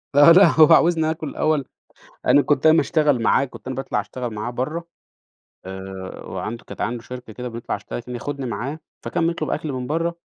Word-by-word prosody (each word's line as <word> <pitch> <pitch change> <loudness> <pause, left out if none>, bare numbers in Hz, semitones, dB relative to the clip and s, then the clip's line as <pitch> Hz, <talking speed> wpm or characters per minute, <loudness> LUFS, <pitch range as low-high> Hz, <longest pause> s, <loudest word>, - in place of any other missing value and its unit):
لأ، 145 +3 +8
لأ 185 +2 +8
هو 160 +1 +8
عاوزني 165 -1 +4
آكل 160 -2 -5
الأول، 155 -3 0 0.6
أنا 145 - +6
كنت 145 0 0
أنا 155 +1 +7
باشتغل 145 -4 +2
معاه، 140 - +3
كنت 130 - -13
أنا 130 - -3
باطلع 135 +1 -2
أشتغل 125 -3 -6
معاه 105 +3 -4
برّه، 150 +8 -4 0.8
آآ، 95 0 -8
وعنده 115 +2 -5
كانت - - -9
عنده 115 +2 -2
شركة 125 -2 -9
كده 125 +3 -6
بيطلع 115 0 -4
يشتغل 100 - -6
كان 125 +1 -8
ياخدني 140 +2 -4
معاه، 135 +6 -4 0.2
فكان 170 -1 0
بيطلب 165 -2 -2
أكل 155 -2 -2
من 125 -1 -4
برّه، 165 +3 -1
135 Hz, 190 wpm, -22 LUFS, 120-155 Hz, 0.8 s, لأ